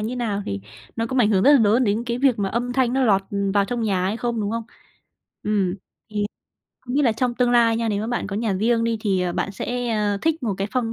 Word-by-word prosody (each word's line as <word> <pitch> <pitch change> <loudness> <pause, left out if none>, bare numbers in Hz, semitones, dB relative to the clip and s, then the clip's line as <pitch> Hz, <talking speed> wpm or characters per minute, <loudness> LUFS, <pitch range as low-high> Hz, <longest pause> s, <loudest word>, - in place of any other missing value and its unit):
như 230 +4 -3
nào 210 -4 -2
thì 100 0 -3 0.4
nó 230 0 -1
cũng 260 +2 -2
ảnh 220 -3 +4
hưởng 190 -2 +3
rất 285 - +7
là 285 - +7
lớn 225 +3 +3
đến 210 +2 +1
cái 240 0 -2
việc 265 -5 +3
mà 195 -1 0
âm 245 +3 -2
thanh 250 -2 +1
nó 265 0 +2
lọt 195 -4 +3 0.3
vào 200 -1 +4
trong 235 +3 -3
nhà 195 -4 0
hay 200 +4 -1
không, 235 -2 -2
đúng 205 0 -1
không? 230 0 -2 0.8
Ừm. 200 -4 0
Thì 200 - -14 1.0
không 250 0 -6
biết 290 - +3
là 240 -5 +3
trong 240 +2 -1
tương 245 -1 +2
lai 230 -2 +4
nha, 230 0 -1
nếu 205 -1 0
mà 215 - -3
bạn 240 -3 -2
có 200 - -4
nhà 220 -1 0
riêng 230 +4 +1
đi 230 -1 0
thì, 195 -4 +1
ờ, 180 -1 -1
bạn 195 - -2
sẽ, 245 +4 -3
ờ, 210 -3 0
thích 320 -3 0
một 215 -4 -1
cái 195 - -2
phong 235 -3 -1
230 Hz, 275 wpm, -22 LUFS, 205-245 Hz, 1.0 s, rất